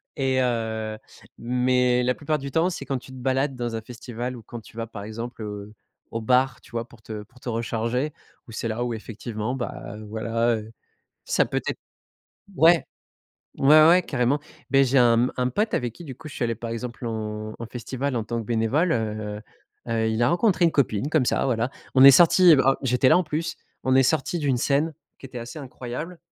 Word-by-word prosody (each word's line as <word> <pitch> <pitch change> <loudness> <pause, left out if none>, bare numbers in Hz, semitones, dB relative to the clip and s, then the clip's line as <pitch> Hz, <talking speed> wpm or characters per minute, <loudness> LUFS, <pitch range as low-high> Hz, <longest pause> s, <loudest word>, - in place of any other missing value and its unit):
Et 130 -2 +1
heu, 110 -3 -2 0.4
mais 125 +1 +2
la 125 +1 +2
plupart 150 +3 -1
du 140 -1 -6
temps 165 +5 +2
c'est 180 - -6
quand 135 0 -2
tu 125 - -16
te 130 - -10
balades 135 +2 0
dans 120 -2 -3
un 110 - -3
festival 120 +2 -6
ou 115 - -12
quand 120 +2 -9
tu 110 - -17
vas, 115 - -2
par 110 -3 -9
exemple, 115 +2 -7
heu, 105 0 -7 0.4
au 115 - -3
bar, 125 +2 +2
tu - - -18
vois, 115 0 -3
pour 115 -2 -18
te 110 -1 -7
pour 120 +4 -21
te 125 - -6
recharger, 115 +5 -1 0.3
où - - -11
c'est 115 - -3
là 115 +2 -2
où, 120 - -2
effectivement, 110 +1 -5
bah, 120 -4 -6
voilà, 115 +2 -1
heu, 110 +1 -9 0.5
ça - - +2
peut - - -2
être - - -2 0.8
ouais, 165 0 +5 0.7
ouais, 155 +3 +7
ouais, 180 +2 +7
carrément. 135 -1 0 0.3
Beh, 135 0 +5
j'ai 135 +1 +1
un, 120 -2 +5
mmh, 125 +2 +1
un 125 0 +1
pote 210 - 0
avec 120 -2 -1
qui, - - -11
du 135 -4 -7
coup, 155 +5 -11
je 145 - -11
suis - - -1
allé 115 -1 0
par 115 +1 -6
exemple, 120 +1 -5
en 110 -1 -4
en 115 - -6
festival, 130 +3 -4
en 115 - -1
tant 115 +2 -3
que 110 - -8
bénévole, 120 - +1
heu 105 -3 -2 0.5
heu 115 - -3
heu, 110 -1 +1
il 110 +1 0
a 120 - +4
rencontré 180 0 +2
une 165 - +4
copine, 135 -1 0
comme 155 -6 +2
ça, - - +1
voilà. 120 -1 0 0.2
On 130 0 +7
est 140 - +12
sortis, 175 +4 +7
en 135 - +5
j'étais 130 0 +3
là, - - +6
en - - +2
plus, 155 +1 -3 0.3
on 130 - +3
est 135 - +6
sortis 155 +5 +1
d'une 140 -5 +1
scène 145 +6 +1 0.2
qui - - -10
était 125 -1 -8
assez 120 +6 -7
incroyable. 135 +5 -7
125 Hz, 220 wpm, -24 LUFS, 115-135 Hz, 0.8 s, est